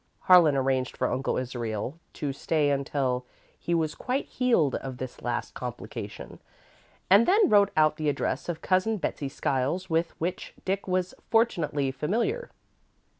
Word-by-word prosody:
Harlan 175 -6 +6
arranged 130 -1 0
for 125 - 0
Uncle 135 - -1
Israel 120 +2 -4
to 145 -2 -3
stay 145 +1 +1
until 135 -2 -1 0.4
he 170 - -1
was 160 -2 0
quite 260 +2 -2
healed 230 - +2
of 130 -2 -4
this 130 -1 -7
last - - -3
complication, - - -7 0.7
and 200 +5 +6
then 405 +2 +5
wrote 205 -5 +5
out 155 -1 +4
the 155 -1 0
address 145 +4 -2
of 165 -2 -4
Cousin 195 +4 +2
Betsey 145 -6 -3
Skiles, 140 +8 -1
with 165 +1 0
which 175 +3 -4
Dick 195 +1 -1
was 185 -1 0 0.2
fortunately 155 - +1
familiar. 230 - -1
155 Hz, 145 wpm, -27 LUFS, 135-190 Hz, 0.7 s, Harlan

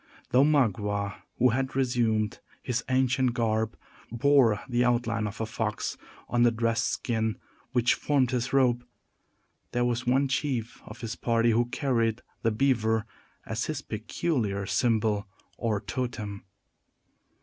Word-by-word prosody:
Though 130 +2 +6
Magua, 105 -8 +1 0.2
who 125 +1 +5
had 130 +3 -1
resumed 115 -5 +1 0.2
his 125 -1 -1
ancient 130 -1 +2
garb, 110 -2 0 0.3
bore 120 -3 +4
the 120 -1 +2
outline 115 -3 +1
of 100 0 -7
a 110 - 0
fox 110 -1 -2 0.3
on 120 - +1
the 120 - +6
dressed 115 +1 0
skin 110 -2 -1 0.3
which 120 -1 +3
formed 140 -4 +1
his 125 -1 -1
robe, 125 -3 +3 0.9
there 120 0 +2
was 120 +1 -1
one 135 +3 +3
chief 130 -4 -2
of - - -10
his 115 0 -4
party 115 -1 +2
who 120 +2 +3
carried 120 -3 0 0.2
the 115 - +2
beaver 110 -2 +1 0.4
as 110 +2 -2
his 155 -3 -4
peculiar 110 - -2
symbol, 110 -3 +1 0.3
or 110 -3 -1
"totem." 105 -2 -4
120 Hz, 135 wpm, -28 LUFS, 110-125 Hz, 0.9 s, Though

